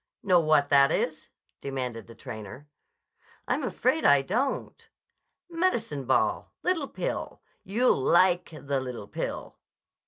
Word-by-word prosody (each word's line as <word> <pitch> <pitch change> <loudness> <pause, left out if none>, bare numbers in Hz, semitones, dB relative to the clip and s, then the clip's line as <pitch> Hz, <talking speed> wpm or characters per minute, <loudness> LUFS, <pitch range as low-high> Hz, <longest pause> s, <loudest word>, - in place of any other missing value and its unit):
"Know 185 -3 +5
what 155 -3 +3
that 140 -1 +5
is?" 155 -1 -2 0.3
demanded 125 -5 -5
the 115 - -13
trainer. 115 +3 -9 0.8
"I'm - - 0
afraid 320 - 0
I 140 -1 +5
don't." 245 - -2 0.6
"Medicine 235 - -1
ball. 130 - +1
Little 335 -6 0
pill. - - -4 0.2
You'll 215 - +2
like 175 +4 +3
the 140 -3 -3
little 125 -5 -6
pill." - - -5
150 Hz, 120 wpm, -27 LUFS, 135-215 Hz, 0.8 s, Know